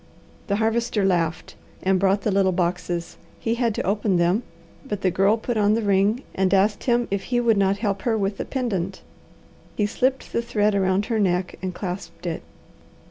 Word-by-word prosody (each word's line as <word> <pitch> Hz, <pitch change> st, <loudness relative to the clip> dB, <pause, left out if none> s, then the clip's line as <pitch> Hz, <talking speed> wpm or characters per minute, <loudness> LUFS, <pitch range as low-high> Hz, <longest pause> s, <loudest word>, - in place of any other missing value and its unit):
The 200 Hz, -, +1 dB
Harvester 225 Hz, -1 st, +1 dB
laughed 175 Hz, -2 st, 0 dB, 0.3 s
and 190 Hz, 0 st, +3 dB
brought 195 Hz, +1 st, +2 dB
the 210 Hz, -, +1 dB
little 195 Hz, -1 st, +3 dB
boxes. 175 Hz, -1 st, -2 dB, 0.2 s
He 225 Hz, -, 0 dB
had 235 Hz, -3 st, 0 dB
to -, -, -2 dB
open 200 Hz, -1 st, +1 dB
them, 175 Hz, +6 st, +2 dB, 0.4 s
but 210 Hz, -8 st, -4 dB
the 185 Hz, -, +2 dB
Girl 195 Hz, +5 st, +3 dB
put 230 Hz, +1 st, -3 dB
on 210 Hz, 0 st, +3 dB
the 230 Hz, -, -1 dB
ring 200 Hz, +5 st, +2 dB
and 190 Hz, -1 st, +1 dB
asked 205 Hz, +2 st, +2 dB
him 240 Hz, -1 st, +2 dB
if 200 Hz, -1 st, -1 dB
he 245 Hz, -1 st, +1 dB
would 235 Hz, -2 st, +3 dB
not 195 Hz, 0 st, +2 dB
help 200 Hz, -1 st, 0 dB
her 230 Hz, -2 st, +1 dB
with 200 Hz, -1 st, -1 dB
the -, -, -3 dB
pendant. 195 Hz, -8 st, -3 dB, 0.7 s
He 210 Hz, -, +1 dB
slipped 255 Hz, +5 st, -1 dB
the 235 Hz, -, +1 dB
thread 215 Hz, -3 st, +1 dB
around 190 Hz, 0 st, +1 dB
her 225 Hz, -1 st, -1 dB
neck 180 Hz, -2 st, +1 dB
and 185 Hz, 0 st, -2 dB
clasped 185 Hz, 0 st, -6 dB
it. 165 Hz, -2 st, -3 dB
200 Hz, 190 wpm, -23 LUFS, 190-225 Hz, 0.7 s, and